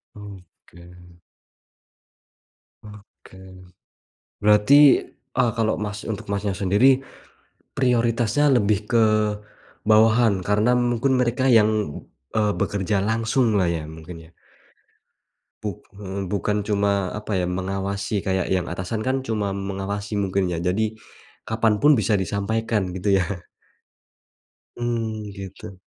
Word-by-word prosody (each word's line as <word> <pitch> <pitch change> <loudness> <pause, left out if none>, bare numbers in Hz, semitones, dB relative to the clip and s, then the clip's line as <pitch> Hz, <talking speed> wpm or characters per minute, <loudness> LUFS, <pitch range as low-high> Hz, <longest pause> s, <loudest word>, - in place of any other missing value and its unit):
Oke. 90 -3 -14 1.9
Oke. 105 -2 -15 1.1
Berarti, 105 +5 +5 0.6
eee, 125 -2 +3
kalau 110 -1 +1
Mas 105 0 -5
untuk 110 0 -5
Masnya 100 -1 -1
sendiri 120 +9 +3 0.8
prioritasnya 120 0 +2
lebih 105 -2 +2
ke 115 -2 +4 0.9
bawahan 110 +1 +5
karena 105 +4 +2
mungkin 120 +2 +1
mereka 125 +1 0
yang, 110 0 +4 0.7
eee, 105 -2 +2
bekerja 100 +1 -1
langsung 115 +1 +1
lah 90 - +2
ya 85 -2 -2
mungkin 80 +2 -10
ya? - - -26 1.3
Buk 105 -4 -6
eee, 100 -1 -6
bukan 105 +2 -1
cuma, 100 -2 0
apa 105 -2 -3
ya, 90 - 0
mengawasi 95 +2 -3
kayak 95 -1 -1
yang 90 -2 0
atasan 95 +6 -4
kan 130 +1 0
cuma 105 -5 -2
mengawasi 100 +1 -4
mungkin 95 -2 0
ya. 85 - -2
Jadi 105 +6 -1 0.5
kapan 110 -1 +1
pun 150 +8 +5
bisa 110 -4 +2
disampaikan 100 +1 -1
gitu 100 +2 0
ya? 90 -1 -5 1.3
Mmm, 115 -3 -3
gitu. 95 -1 -9
105 Hz, 110 wpm, -23 LUFS, 95-110 Hz, 1.9 s, Berarti